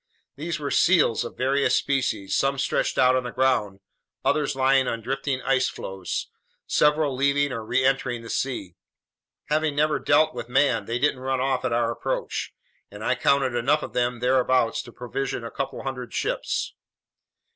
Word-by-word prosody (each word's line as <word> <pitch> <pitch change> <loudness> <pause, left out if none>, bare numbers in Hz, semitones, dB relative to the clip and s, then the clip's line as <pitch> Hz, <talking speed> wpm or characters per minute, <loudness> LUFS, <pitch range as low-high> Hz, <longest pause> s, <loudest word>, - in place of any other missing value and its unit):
These 165 +4 -3
were 140 -2 -3
seals 165 -10 +3
of - - -8
various 135 +2 +2
species, 125 -8 0
some 135 0 +1
stretched - - 0
out 130 0 +5
on 130 - +2
the 125 - -5
ground, 105 -8 0 0.4
others 150 -3 +1
lying 135 0 +3
on 115 -2 -3
drifting 135 +1 -2
ice 130 0 +2
floes, 95 -2 -5 0.3
several 150 -2 +2
leaving 140 +1 +2
or 115 -3 -4
reentering 130 0 0
the 115 - -9
sea. 120 -9 -3 0.8
Having 155 -1 +1
never 150 +1 +2
dealt 150 +2 +3
with 120 -1 -7
man, 125 -5 +2
they 115 +3 -2
didn't 140 0 +1
run 130 0 -1
off 130 0 0
at 125 - 0
our 115 0 +1
approach, - - -3 0.4
and 105 +1 -10
I 130 - +2
counted 130 0 +2
enough 120 +6 +1
of - - -7
them 120 -1 -1
thereabouts 125 -2 +2
to 120 - -12
provision 125 +1 -4
a 115 - -6
couple 140 - -4
hundred 125 -3 -5
ships. - - -2
130 Hz, 165 wpm, -25 LUFS, 120-140 Hz, 0.8 s, out